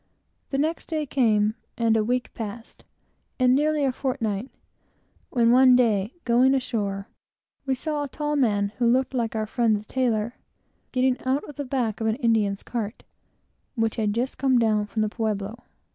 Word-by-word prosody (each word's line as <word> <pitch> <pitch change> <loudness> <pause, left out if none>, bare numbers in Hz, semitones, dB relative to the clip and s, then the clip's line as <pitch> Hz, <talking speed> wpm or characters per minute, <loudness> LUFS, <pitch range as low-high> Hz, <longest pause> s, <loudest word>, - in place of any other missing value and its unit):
The 275 - -1
next 315 +4 -1
day 310 -2 -2
came, 215 -6 +2 0.2
and 230 -1 +2
a 220 - +2
week 250 +3 -1
passed, 225 +1 -8 0.5
and 255 -1 +4
nearly 300 +1 +2
a 265 - +2
fortnight, 250 -4 -2 0.8
when, 235 -2 +3
one 255 0 +7
day, 220 - +2
going 255 +3 +4
ashore, 200 -6 -2 0.6
we 265 - +2
saw 300 +2 -3
a 290 - -2
tall 295 +2 -2
man, 205 -7 +2
who 235 -1 +4
looked 260 +2 +1
like 230 -3 -1
our 215 0 0
friend 225 0 +1
the 210 0 -5
tailor, 235 -2 -1 0.5
getting 255 0 +1
out 265 +3 0
of 295 - -10
the 285 - -4
back 245 -5 -2
of 220 - 0
an 220 - +1
Indian's 220 -6 +1
cart, 225 -2 -4 0.7
which 225 -1 0
had 215 -2 +1
just 250 +3 -2
come 265 -2 +3
down 215 -3 +2
from 215 +2 -1
the 215 - 0
pueblo. 215 0 -3
235 Hz, 175 wpm, -25 LUFS, 215-260 Hz, 0.8 s, one